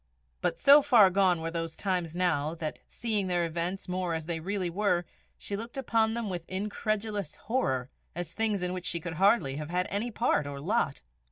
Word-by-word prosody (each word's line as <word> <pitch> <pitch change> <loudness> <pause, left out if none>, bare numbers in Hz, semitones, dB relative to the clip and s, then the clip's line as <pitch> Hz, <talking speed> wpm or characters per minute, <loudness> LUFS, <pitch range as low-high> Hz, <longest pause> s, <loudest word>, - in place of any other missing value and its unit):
But - - 0
so 285 +2 +8
far 235 -9 +6
gone 185 -3 +3
were 165 0 -3
those 165 -1 -4
times 180 -4 -1
now, 160 -3 +1
that, 155 -2 -5
seeing 215 -5 -1
their 175 -1 +1
events 170 +3 -3
more 180 -2 -1
as 160 -1 -4
they 165 -1 -3
really 190 +2 -2
were, 180 -1 +1 0.3
she 200 - -4
looked 230 +5 -7
upon 225 -4 +1
them 235 -2 -2
with 175 -3 -5
incredulous 205 -1 -2
horror, 135 - -1 0.2
as 170 -1 -4
things 215 -3 +1
in 180 0 -1
which 185 -1 -4
she 170 - -1
could 170 0 -5
hardly 195 - +3
have 150 0 -5
had 180 +1 0
any 210 +4 -1
part 230 -10 +1
or 140 -1 -6
lot. 140 - 0
180 Hz, 195 wpm, -29 LUFS, 165-210 Hz, 0.3 s, so